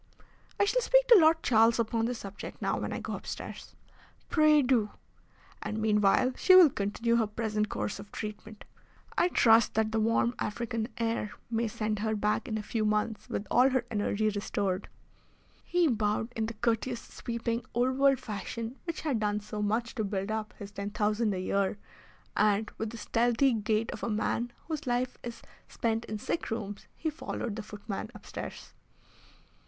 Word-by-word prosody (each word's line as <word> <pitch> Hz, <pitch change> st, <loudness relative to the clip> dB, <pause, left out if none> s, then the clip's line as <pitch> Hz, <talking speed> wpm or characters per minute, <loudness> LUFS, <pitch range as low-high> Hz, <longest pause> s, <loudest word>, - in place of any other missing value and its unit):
"I 405 Hz, -, +5 dB
shall -, -, +2 dB
speak -, -, +4 dB
to 470 Hz, -, +10 dB
Lord 320 Hz, 0 st, +5 dB
Charles 225 Hz, 0 st, +5 dB
upon 230 Hz, 0 st, 0 dB
the 245 Hz, +1 st, -1 dB
subject 200 Hz, -2 st, -8 dB
now -, -, 0 dB
when -, -, -3 dB
I -, -, -3 dB
go -, -, -5 dB
upstairs." -, -, -7 dB, 0.5 s
"Pray 305 Hz, -2 st, +5 dB
do." 245 Hz, -5 st, +2 dB, 0.7 s
"And 215 Hz, -, -3 dB
meanwhile 215 Hz, +3 st, +3 dB
she 370 Hz, -, +6 dB
will 350 Hz, -6 st, +9 dB
continue 230 Hz, +3 st, 0 dB
her 225 Hz, -2 st, +2 dB
present 215 Hz, -1 st, -1 dB
course 200 Hz, -, -3 dB
of 205 Hz, +1 st, -11 dB
treatment. 215 Hz, 0 st, -7 dB, 0.5 s
I 350 Hz, -, +4 dB
trust 230 Hz, -9 st, +5 dB
that 220 Hz, 0 st, +1 dB
the 220 Hz, -, +1 dB
warm 230 Hz, +2 st, +2 dB
African 230 Hz, 0 st, -2 dB
air 225 Hz, -2 st, -1 dB, 0.2 s
may 230 Hz, 0 st, +1 dB
send 215 Hz, -1 st, -2 dB
her 220 Hz, +1 st, 0 dB
back 210 Hz, 0 st, 0 dB
in 220 Hz, -, -2 dB
a 215 Hz, -, -4 dB
few 220 Hz, +1 st, -1 dB
months 210 Hz, +1 st, -1 dB
with 200 Hz, -, -3 dB
all 250 Hz, +3 st, +6 dB
her 255 Hz, -2 st, 0 dB
energy 215 Hz, 0 st, +1 dB
restored." 200 Hz, -2 st, -2 dB, 0.7 s
He 355 Hz, -1 st, +2 dB
bowed 220 Hz, -1 st, 0 dB
in 220 Hz, -1 st, -1 dB
the 230 Hz, -, -6 dB
courteous, 235 Hz, +2 st, 0 dB
sweeping, 235 Hz, 0 st, -3 dB
old 255 Hz, +2 st, +1 dB
world 275 Hz, -1 st, +5 dB
fashion 230 Hz, +2 st, -5 dB
which 335 Hz, -2 st, -4 dB
had 280 Hz, -8 st, 0 dB
done 210 Hz, -1 st, 0 dB
so 210 Hz, 0 st, -6 dB
much 220 Hz, +3 st, 0 dB
to 220 Hz, -, -2 dB
build 200 Hz, 0 st, -2 dB
up 220 Hz, -1 st, -3 dB
his 200 Hz, 0 st, -8 dB
ten 200 Hz, 0 st, -4 dB
thousand 210 Hz, +1 st, +1 dB
a -, -, -3 dB
year, 195 Hz, +2 st, 0 dB, 0.6 s
and, 210 Hz, 0 st, +2 dB
with 220 Hz, -, -2 dB
the 230 Hz, -, -8 dB
stealthy 240 Hz, +4 st, +2 dB
gait 220 Hz, +1 st, 0 dB
of -, -, -7 dB
a -, -, -2 dB
man 230 Hz, +2 st, -1 dB, 0.2 s
whose 315 Hz, -5 st, -4 dB
life 245 Hz, +1 st, -1 dB
is 235 Hz, -1 st, -8 dB, 0.2 s
spent 225 Hz, 0 st, -1 dB
in 215 Hz, -, -4 dB
sick 270 Hz, -, -3 dB
rooms, 205 Hz, -3 st, -5 dB
he 315 Hz, -, -2 dB
followed 240 Hz, -7 st, -4 dB
the 220 Hz, -, -4 dB
footman 210 Hz, 0 st, -6 dB
upstairs. -, -, -8 dB
225 Hz, 180 wpm, -30 LUFS, 210-240 Hz, 0.7 s, to